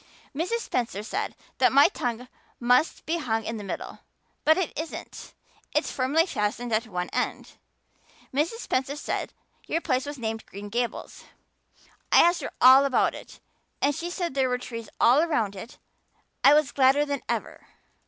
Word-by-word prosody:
"Mrs. 365 +10 -1
Spencer 225 - -2
said 395 - -3 0.2
that - - +5
my 280 +1 +7
tongue 245 0 -4 0.3
must 250 +6 +2
be 335 +2 -1
hung 225 -6 -1
in 225 - -3
the 210 - -7
middle. 195 - -6 0.4
But 315 +1 +5
it 375 -3 -2
isn't 320 +1 -7 0.4
it's - - +1
firmly 280 +6 +2
fastened 230 - -2
at 220 +2 +1
one 180 -3 -4
end. - - -3 0.8
Mrs. 330 - -1
Spencer 265 +2 -1
said 295 - -3 0.4
your 330 - 0
place 265 -4 -1
was 290 0 -6
named 225 -2 -4
Green 205 +1 -9
Gables. 240 +2 -4 0.9
I - - +7
asked 345 +1 +3
her - - -4
all 260 +2 +8
about 275 - +2
it. - - -11 0.4
And 285 +1 +2
she 335 +4 -4
said 350 -3 -3
there 265 -1 +1
were 250 - 0
trees 230 -2 -8
all 250 +5 +5
around 235 -12 0
it. 220 +5 -10 0.7
I 285 - +8
was 300 -2 +2
gladder 275 +2 +4
than 285 -2 -3
ever. - - -4
260 Hz, 165 wpm, -26 LUFS, 230-305 Hz, 0.9 s, all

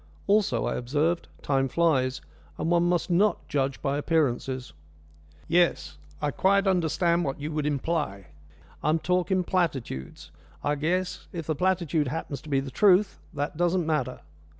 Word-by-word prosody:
"Also," 205 0 +2
I - - -1
observed, 150 +8 0 0.2
"time 135 -1 +1
flies, 130 -5 +1 0.4
and 165 - -1
one 175 0 +3
must 175 0 0
not 200 +5 +2
judge 135 -1 -1
by 140 0 0
appearances." 135 -5 0 0.7
"Yes, 175 +1 +1 0.2
I 150 -1 -1
quite 195 +6 +3
understand 175 -1 +2
what 135 -3 -3
you 150 +2 -4
would 150 -1 -1
imply. 145 - -2 0.5
I - - 0
am 155 - +3
talking 180 +2 +1
platitudes. 140 - -2 0.3
I 145 - +1
guess, 180 +5 -1
if 165 -3 -5
the 155 - 0
platitude 170 -3 +1
happens 140 -1 -4
to 155 - -12
be 135 -2 +2
the 135 0 -5
truth 195 +5 +4 0.2
that 145 +1 -3
doesn't 175 0 +1
matter. 150 -5 -1
160 Hz, 150 wpm, -27 LUFS, 140-175 Hz, 0.7 s, truth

